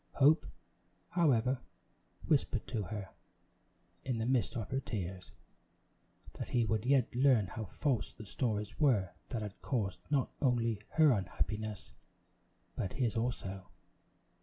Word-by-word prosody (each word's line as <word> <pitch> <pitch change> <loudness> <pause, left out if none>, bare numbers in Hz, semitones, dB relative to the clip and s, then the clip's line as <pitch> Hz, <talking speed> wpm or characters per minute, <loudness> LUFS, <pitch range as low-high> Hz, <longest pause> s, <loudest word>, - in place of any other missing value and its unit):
Hope, 145 +4 +5 0.6
however, 130 -7 +3 0.7
whispered - - +1
to 105 -3 -2
her, 105 -2 -5 0.9
in 130 -3 -1
the 110 - -1
midst 125 0 +1
of 110 -5 -4
her 135 - +1
tears, 95 -7 -5 1.1
that - - -4
he 120 -2 +2
would 110 +1 0
yet 135 -3 +3
learn 125 -4 +4
how 110 +4 -5
false 125 - -1
the 110 - -11
stories 105 0 -2
were 110 - +3 0.2
that 115 -4 -2
had 105 -2 -7
caused 100 -9 -1
not 140 -3 +1
only 115 -6 +2
her 155 -2 +6
unhappiness, 105 0 -2 0.8
but 95 - -2
his 120 -4 0
also. 100 -5 -2
115 Hz, 130 wpm, -34 LUFS, 105-130 Hz, 1.1 s, her